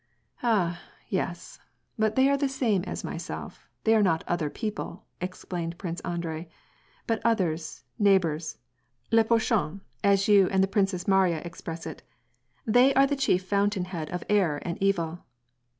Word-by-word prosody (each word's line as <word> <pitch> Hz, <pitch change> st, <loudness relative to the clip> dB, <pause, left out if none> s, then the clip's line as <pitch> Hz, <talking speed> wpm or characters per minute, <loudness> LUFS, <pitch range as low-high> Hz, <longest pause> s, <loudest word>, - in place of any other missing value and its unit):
" -, -, -49 dB
Ah, 180 Hz, -8 st, +1 dB, 0.3 s
yes, -, -, -3 dB, 0.4 s
but 220 Hz, -1 st, +1 dB
they 265 Hz, +1 st, +5 dB
are 280 Hz, -, +4 dB
the 280 Hz, 0 st, 0 dB
same 235 Hz, -8 st, +1 dB
as -, -, -5 dB
myself, -, -, -7 dB
they 220 Hz, -, +4 dB
are 220 Hz, -, +5 dB
not 165 Hz, -5 st, +2 dB
* -, -, -31 dB
other 175 Hz, -4 st, 0 dB
people'" 210 Hz, -1 st, -5 dB, 0.2 s
explained 175 Hz, -2 st, -4 dB
Prince 175 Hz, -2 st, -5 dB
Anhrei, 170 Hz, -1 st, -4 dB, 0.6 s
"but 225 Hz, -1 st, -1 dB
others, 165 Hz, -9 st, 0 dB, 0.2 s
neigh 200 Hz, -2 st, +6 dB
bors, 160 Hz, -3 st, -3 dB, 0.5 s
le 225 Hz, 0 st, +6 dB
prochain, 220 Hz, -5 st, +1 dB, 0.2 s
as 200 Hz, -1 st, +4 dB
you 200 Hz, -3 st, +6 dB
and 190 Hz, 0 st, +3 dB
the -, -, +2 dB
Princess 195 Hz, -2 st, 0 dB
Mariya 190 Hz, -5 st, +3 dB
express 165 Hz, -1 st, -7 dB
it, -, -, -7 dB, 0.4 s
— -, -, -42 dB
they 260 Hz, +3 st, +6 dB
are 270 Hz, +1 st, +6 dB
the 285 Hz, +1 st, 0 dB
chief 240 Hz, -9 st, +2 dB
fountain 200 Hz, -1 st, +1 dB
head 170 Hz, -4 st, -5 dB
of 180 Hz, -, -4 dB
error 190 Hz, -8 st, +2 dB
and 170 Hz, +1 st, -4 dB
evil. 175 Hz, -4 st, 0 dB
190 Hz, 165 wpm, -27 LUFS, 170-220 Hz, 0.6 s, neigh